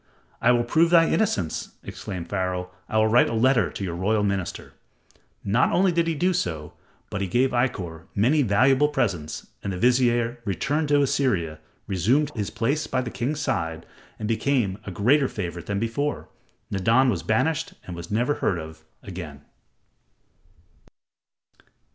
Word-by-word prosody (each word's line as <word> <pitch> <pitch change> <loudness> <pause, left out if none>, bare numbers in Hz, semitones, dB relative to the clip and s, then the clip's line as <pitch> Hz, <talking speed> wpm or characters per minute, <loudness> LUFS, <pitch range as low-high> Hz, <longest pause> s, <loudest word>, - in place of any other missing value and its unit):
"I 120 - +5
will 120 -1 +3
prove 160 +8 +3
thy 165 -1 +6
innocence," 100 - -1
exclaimed 90 -4 -6
Pharaoh. 90 -1 -2 0.2
"I 110 - 0
will 110 - +5
write 110 +3 +4
a 115 - -2
letter 115 -3 +3
to - - -6
your 90 -3 -3
royal 105 +4 +1
master." 100 -3 -3 0.7
Not 105 +6 +2
only 185 0 +3
did 170 -1 +1
he 165 - 0
do 180 +5 +1
so, 80 - -3 0.4
but 100 - -3
he 100 - -1
gave 125 +8 +2
Ikkor 95 -10 -2
many 130 +9 +3
valuable 130 +5 +4
presents 95 - -2 0.2
and 100 - -2
the 90 - -4
vizier 120 +1 +2
returned 140 - -1
to 145 0 +4
Assyria, 95 - 0 0.3
resumed 120 - +1
his 105 -4 -3
place 140 +7 -1
by 130 - 0
the 120 -2 -5
king's 145 +5 -2
side, 80 - -2 0.3
and 105 - -4
became 115 -4 0
a - - -5
greater 130 - +3
favorite 85 -6 -5
than 100 - -1
before. 115 +7 -2 0.4
Nadan 115 +7 +3
was 95 - -2
banished 155 +8 0
and 90 - -7
was 85 0 -8
never 120 +7 +1
heard 95 - 0
of 80 0 -9 0.2
again. 85 -7 -8
110 Hz, 160 wpm, -25 LUFS, 95-135 Hz, 0.7 s, thy